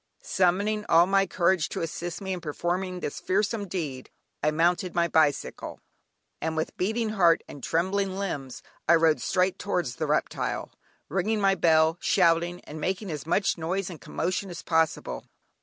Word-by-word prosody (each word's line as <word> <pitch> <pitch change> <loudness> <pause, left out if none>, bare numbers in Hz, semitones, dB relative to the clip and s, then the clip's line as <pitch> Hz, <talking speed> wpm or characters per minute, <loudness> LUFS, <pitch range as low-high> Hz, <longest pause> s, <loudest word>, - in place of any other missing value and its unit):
Summoning 200 +3 +1
all 165 +1 +6
my 195 +1 +2
courage 175 -2 +1
to - - -4
assist 170 +3 -5
me 190 -1 -3
in 180 - -5
performing 175 +3 -2
this - - -4
fearsome 205 +2 0
deed, 150 -8 -4 0.3
I 150 - +3
mounted 175 +4 +1
my 170 -1 +3
bicycle, 155 -4 0 0.6
and 160 0 -2
with 160 - -2
beating 220 +4 0
heart 175 -6 +3
and 140 - -11
trembling 190 +3 0
limbs, 145 -10 -4 0.3
I 170 - +8
rode 160 -1 +3
straight 185 0 +1
towards 175 -11 -2
the - - -2
reptile, - - -1 0.4
ringing 195 +6 0
my 195 -1 +4
bell, 160 -2 +3
shouting, 175 -1 +2
and 155 +1 -9
making 190 +2 -2
as 150 0 -6
much 195 +1 +1
noise 185 +3 -2
and 165 - -10
commotion 185 +2 -2
as 175 - -7
possible. 160 -1 0
175 Hz, 160 wpm, -27 LUFS, 160-195 Hz, 0.6 s, I